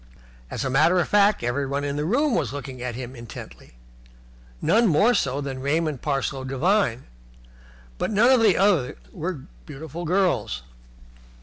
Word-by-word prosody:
As -, -, -4 dB
a -, -, 0 dB
matter 155 Hz, +7 st, +4 dB
of -, -, 0 dB
fact, 205 Hz, -, +3 dB
everyone 140 Hz, +3 st, -1 dB
in 140 Hz, 0 st, -2 dB
the 150 Hz, +1 st, -2 dB
room 270 Hz, -, +1 dB
was 125 Hz, -, 0 dB
looking 135 Hz, -3 st, -7 dB
at 125 Hz, -2 st, -4 dB
him 125 Hz, +1 st, -7 dB
intently, 105 Hz, -, -11 dB, 0.8 s
none 230 Hz, -, +3 dB
more 200 Hz, +8 st, +4 dB
so 140 Hz, -, 0 dB
than 135 Hz, -2 st, -5 dB
Raymond 150 Hz, 0 st, -1 dB
Parsloe 135 Hz, -2 st, -2 dB
Devine, 135 Hz, -, +1 dB, 1.0 s
but -, -, -1 dB
none 220 Hz, +4 st, +4 dB
of 255 Hz, -3 st, +5 dB
the 210 Hz, -6 st, +4 dB
others 180 Hz, -10 st, +2 dB, 0.2 s
were 170 Hz, -4 st, -4 dB, 0.3 s
beautiful 160 Hz, +4 st, -7 dB
girls. 160 Hz, -, 0 dB
145 Hz, 150 wpm, -24 LUFS, 130-190 Hz, 1.0 s, of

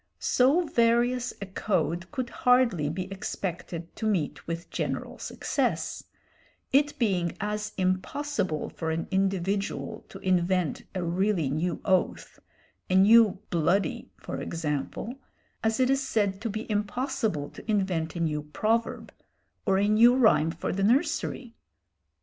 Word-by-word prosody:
So 280 Hz, +8 st, +3 dB
various 240 Hz, -1 st, +2 dB
a -, -, -3 dB
code 185 Hz, -2 st, -1 dB
could 255 Hz, -4 st, -3 dB
hardly 245 Hz, -, +3 dB
be 180 Hz, +4 st, -3 dB
expected 175 Hz, -3 st, -5 dB
to 220 Hz, -, -1 dB
meet 180 Hz, -9 st, -1 dB
with 165 Hz, +1 st, -5 dB
general -, -, -3 dB
success, -, -, -2 dB, 0.7 s
it 290 Hz, +2 st, +3 dB
being 185 Hz, -7 st, 0 dB
as 210 Hz, 0 st, -3 dB
impossible 185 Hz, -, -1 dB
for 160 Hz, -, -4 dB
an 160 Hz, +1 st, -2 dB
individual 195 Hz, +1 st, -1 dB
to -, -, -9 dB
invent 180 Hz, -3 st, +1 dB
a 185 Hz, -, -1 dB
really 175 Hz, -3 st, +1 dB
new 165 Hz, +3 st, -1 dB
oath 185 Hz, -2 st, 0 dB, 0.5 s
a 185 Hz, -, +2 dB
new 210 Hz, +1 st, +6 dB
"bloody," 175 Hz, +2 st, +1 dB
for -, -, -6 dB
example 165 Hz, -, -3 dB, 0.4 s
as 220 Hz, +1 st, +1 dB
it 255 Hz, 0 st, +3 dB
is 270 Hz, 0 st, +2 dB
said 205 Hz, -7 st, 0 dB
to 230 Hz, -, -2 dB
be 215 Hz, +2 st, -4 dB
impossible 210 Hz, -, -1 dB
to -, -, -12 dB
invent 185 Hz, -6 st, 0 dB
a -, -, -3 dB
new 150 Hz, -2 st, 0 dB
proverb 215 Hz, +10 st, -1 dB, 0.5 s
or 190 Hz, -, +4 dB
a 200 Hz, +1 st, +2 dB
new 230 Hz, +4 st, +6 dB
rhyme 165 Hz, -11 st, +4 dB
for 165 Hz, -, -3 dB
the 195 Hz, +1 st, -1 dB
nursery. 240 Hz, +1 st, +1 dB
195 Hz, 135 wpm, -27 LUFS, 170-230 Hz, 0.7 s, new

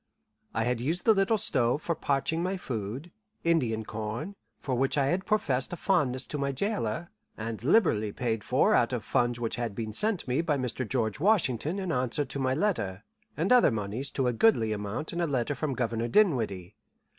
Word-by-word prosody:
I 115 Hz, -, +1 dB
had 120 Hz, 0 st, -1 dB
used 165 Hz, +8 st, -2 dB
the 220 Hz, -, +7 dB
little 195 Hz, +2 st, +2 dB
stove 135 Hz, -, +1 dB
for 170 Hz, -, 0 dB
parching 145 Hz, +2 st, -1 dB
my 185 Hz, +2 st, -1 dB
food 125 Hz, -, -5 dB, 0.3 s
Indian 120 Hz, -10 st, +1 dB
corn, 110 Hz, -, -5 dB, 0.2 s
for 135 Hz, -, -3 dB
which 135 Hz, +3 st, +1 dB
I 140 Hz, -, +3 dB
had 180 Hz, +7 st, -1 dB
professed 140 Hz, -12 st, 0 dB
a -, -, -4 dB
fondness 135 Hz, -10 st, +1 dB
to 150 Hz, -, -4 dB
my 140 Hz, 0 st, 0 dB
jailer, 165 Hz, -, -2 dB, 0.3 s
and 110 Hz, 0 st, -5 dB
liberally 125 Hz, -, +3 dB
paid 115 Hz, -2 st, -2 dB
for -, -, +3 dB
out -, -, +3 dB
of -, -, -2 dB
funds 120 Hz, 0 st, 0 dB
which 115 Hz, -2 st, -2 dB
had 115 Hz, -4 st, -3 dB
been 110 Hz, -1 st, -4 dB
sent 210 Hz, -, +1 dB
me 130 Hz, +5 st, +1 dB
by 155 Hz, -4 st, 0 dB
Mr. 125 Hz, -2 st, -3 dB
George 110 Hz, -5 st, 0 dB
Washington 165 Hz, -, +2 dB
in 190 Hz, -3 st, -2 dB
answer 130 Hz, +2 st, 0 dB
to 135 Hz, +1 st, -5 dB
my 130 Hz, -1 st, +1 dB
letter, 115 Hz, -, -1 dB, 0.3 s
and 170 Hz, +8 st, 0 dB
other 250 Hz, -8 st, +6 dB
moneys 110 Hz, +3 st, -3 dB
to 135 Hz, -, 0 dB
a 125 Hz, -, +1 dB
goodly 115 Hz, -, +3 dB
amount 105 Hz, +10 st, -4 dB
in 170 Hz, -, -1 dB
a 170 Hz, -, +1 dB
letter 135 Hz, -1 st, 0 dB
from 140 Hz, 0 st, -2 dB
Governor 115 Hz, -2 st, -1 dB
Dinwiddie. 115 Hz, -, +1 dB
130 Hz, 195 wpm, -28 LUFS, 115-170 Hz, 0.3 s, the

